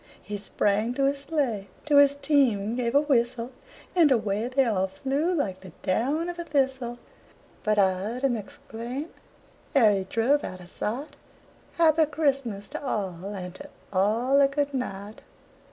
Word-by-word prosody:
He 205 0 -6
sprang 210 +3 0
to 275 - 0
his 275 +1 +1
sleigh, 275 -9 -1 0.2
to 295 -1 +4
his 285 0 +6
team 270 -8 +2
gave 245 0 -1
a 285 - +6
whistle, 245 -4 0 0.4
And 330 -5 +5
away 215 -2 +1
they 260 +1 +2
all 190 -5 +1
flew 275 - -1
like 210 - -1
the 185 -3 -12
down 280 - 0
of 350 0 -5
a - - -2
thistle; 265 -5 -1 0.6
But 215 -1 +1
I 195 -2 +5
heard 215 +8 -5
him 265 -3 +2
exclaim, 235 +7 -6 0.7
ere 230 -6 +6
he 195 -2 0
drove 240 +9 +1
out 185 - -6
of 180 0 -13
sight: 255 +8 -4 0.6
"Happy 320 -2 +4
Christmas 275 -9 -1
to 305 0 -6
all, 190 -8 -3
and 190 -3 -6
to 190 - -11 0.2
all 230 +8 +3
a 275 - +6
good 285 0 -1
night!" 210 -5 -5
245 Hz, 165 wpm, -26 LUFS, 205-280 Hz, 0.7 s, his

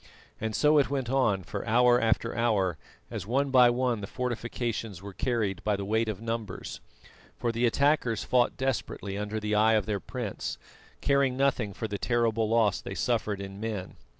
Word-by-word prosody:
And 110 -1 -2
so 150 0 +5
it 140 - +2
went 135 -3 -2
on 110 -8 +2
for 100 0 -5
hour 120 +2 +5
after 115 +1 +1
hour, 100 -9 +1 0.3
as 90 - -5
one 135 +4 +1
by 125 -2 +7
one 120 -2 0
the 100 - -5
fortifications 120 -4 -3
were 100 +1 -9
carried 110 -4 -1
by 105 -1 +1
the 100 0 -4
weight 110 +2 +1
of 105 -3 -4
numbers, 115 -4 -5 0.6
for 120 - 0
the 120 +1 +2
attackers 130 -3 +2
fought 125 -1 +2
desperately 120 -6 -2
under 105 +1 -3
the 105 0 -2
eye 110 +1 +4
of 105 -3 +2
their 105 -1 -1
prince, - - -5 0.4
caring 140 -2 +2
nothing 135 -6 +1
for 110 - -4
the 100 -1 -4
terrible 115 -2 +1
loss 110 -4 +2
they 95 - -6
suffered 110 -4 0
in 100 0 -7
men. 105 -4 -4
115 Hz, 180 wpm, -28 LUFS, 105-125 Hz, 0.6 s, by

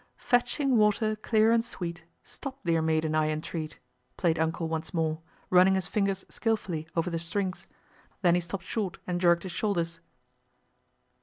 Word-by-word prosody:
Fetching 245 +2 +2
water 215 +1 +3
clear 220 +1 +3
and 230 0 +4
sweet, 170 -8 -5 0.2
Stop, 275 -2 -7
dear 165 -1 +2
maiden, 160 -1 +1
I 155 0 +2
entreat— 155 0 -4 0.4
played 165 -3 +1
"Uncle" 165 +1 0
once 160 +1 -4
more, 160 -1 0 0.3
running 185 +1 +6
his 190 -2 0
fingers 195 -1 -1
skillfully 190 -9 -2
over 170 +1 0
the 165 - -1
strings, 185 +2 -3 0.4
and - - -37
then 175 -2 +5
he 175 - +3
stopped 175 +2 -5
short 200 +1 -2
and 175 -1 -2
jerked 170 -1 +4
his 185 - -5
shoulders. 170 -4 -1
175 Hz, 160 wpm, -28 LUFS, 165-210 Hz, 0.4 s, running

